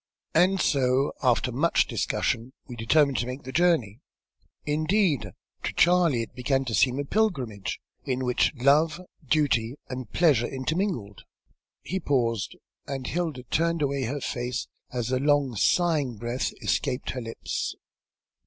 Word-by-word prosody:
And 190 +2 +4
so, 135 -2 +2
after 125 -1 +2
much 150 +8 +2
discussion 120 +3 -1
we 125 - -8
determined 140 +5 +3
to 120 - -1
make 130 +2 -6
the 130 - -7
journey. 145 - +2 0.6
Indeed, 155 - +1 0.3
to - - -3
Charley 170 -8 +4
it - - -10
began 135 +1 0
to 120 - -3
seem 125 +3 +3
a 145 - -2
pilgrimage, 135 - -1 0.2
in 130 0 -2
which 125 -1 +2
love, 150 +6 +3 0.2
duty, 135 -5 +1
and 130 -3 -5
pleasure 140 -9 +3
intermingled." 135 - -2 0.6
He 190 - -2
paused, 115 - 0 0.3
and 135 -2 -4
Hilda 160 -6 -2
turned 165 0 +1
away 140 -2 0
her 140 +5 -3
face 125 -1 -3 0.2
as 125 -1 -2
a 130 - +2
long 145 -3 +2
sighing 145 - +2
breath 120 +3 -2
escaped 125 - -1
his 125 -2 -5
lips. 115 0 -4
135 Hz, 140 wpm, -26 LUFS, 120-155 Hz, 0.6 s, And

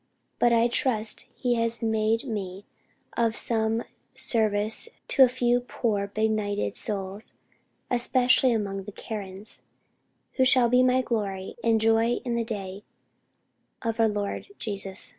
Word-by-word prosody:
but 240 - +4
I 230 0 +4
trust 225 -3 -1
He 245 -1 0
has 230 0 0
made 220 0 +1
me 200 -5 -5 0.5
of 230 -1 +1
some 225 0 +1 0.3
service 215 - +1 0.2
to 275 - +2
a 255 - +6
few 245 -1 +2
poor 220 -4 -2
benighted 205 - -1
souls, 200 0 -3 0.6
especially 255 +1 +3
among 200 -4 -2
the 210 - -7
Karens, 200 -1 -7 0.8
who 260 - +4
shall 255 -2 +5
be 250 +1 +5
my 255 0 +3
glory 200 -5 -3
and 225 -1 +3
joy 225 +1 +3
in 240 - -1
the 235 0 0
day 200 -3 -6 1.0
of 225 -1 -1
the 225 -1 +4
Lord 205 -1 -3
Jesus." 200 -2 -5
220 Hz, 135 wpm, -26 LUFS, 205-240 Hz, 1.0 s, a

